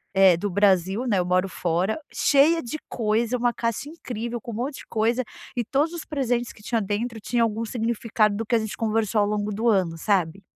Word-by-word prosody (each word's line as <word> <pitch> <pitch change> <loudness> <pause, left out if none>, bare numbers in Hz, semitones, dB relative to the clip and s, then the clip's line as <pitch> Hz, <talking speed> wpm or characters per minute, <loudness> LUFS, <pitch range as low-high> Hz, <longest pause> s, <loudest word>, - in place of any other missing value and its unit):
eh, 190 -2 +7
do 205 - -2
Brasil, 195 +3 +2
né, 210 -5 +2
eu 180 - +1
moro 180 +1 +2
fora, 180 +4 0 0.2
cheia 310 +4 +4
de 240 +5 -5
coisa, 225 +1 0
uma 240 0 +2
caixa 230 +5 -2
incrível, 240 -7 -5
com 235 - -7
um - - -6
monte 260 +5 -3
de - - -11
coisa 230 +3 +1 0.3
e 240 - +1
todos 290 +7 +1
os 340 - -5
presentes 245 -5 -1
que - - -18
tinha 230 +2 0
dentro 220 +3 -2
tinha 240 +3 0
algum 225 0 0
significado 225 -2 0
do 225 +2 -3
que 225 - -4
a 230 - +5
gente 220 -1 -4
conversou 220 -1 +1
ao 205 - +2
longo 210 0 -1
do 225 +3 -1
ano, 185 -6 +1
sabe. 185 0 0
220 Hz, 215 wpm, -24 LUFS, 205-240 Hz, 0.3 s, eh